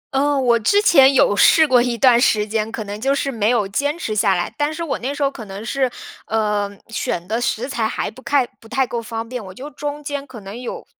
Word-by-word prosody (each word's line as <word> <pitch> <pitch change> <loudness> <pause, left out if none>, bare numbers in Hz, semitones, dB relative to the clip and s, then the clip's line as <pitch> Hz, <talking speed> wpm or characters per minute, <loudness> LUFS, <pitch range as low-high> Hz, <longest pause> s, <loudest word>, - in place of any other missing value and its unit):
嗯， 280 -1 +1
我 235 -1 +4
之 405 - +3
前 275 -9 +6
有 205 - +4
试 315 +8 +6
过 250 -2 +4
一 240 -1 -1
段 245 -1 +5
时 210 -5 +3
间 220 +1 -2
可 220 - -4
能 205 +1 -7
就 275 +2 +1
是 275 0 -1
没 220 -2 0
有 225 -5 +1
坚 285 +10 -1
持 215 -10 -4
下 200 -3 +3
来。 175 - -3
但 295 +1 +1
是 335 +2 -5
我 315 - -3
那 260 +4 -3
时 285 - -2
候 275 - +1
可 225 -5 -9
能 200 +3 -8
是 260 -1 0 0.4
呃， 210 -2 0 0.2
选 180 -5 -3
的 225 +3 -1
食 245 +2 -1
材 230 -5 -1
还 220 - -3
不 260 - -15
太 280 -3 +2
不 225 - -16
太 265 +2 +1
够 235 -1 -4
方 225 0 -5
便， 250 -3 -6
我 190 - -10
就 290 +3 -8
中 290 +1 -5
间 285 -1 -5
可 250 -4 -10
能 200 +5 -8
有 245 - -6
240 Hz, 275 characters per minute, -20 LUFS, 215-275 Hz, 0.4 s, 前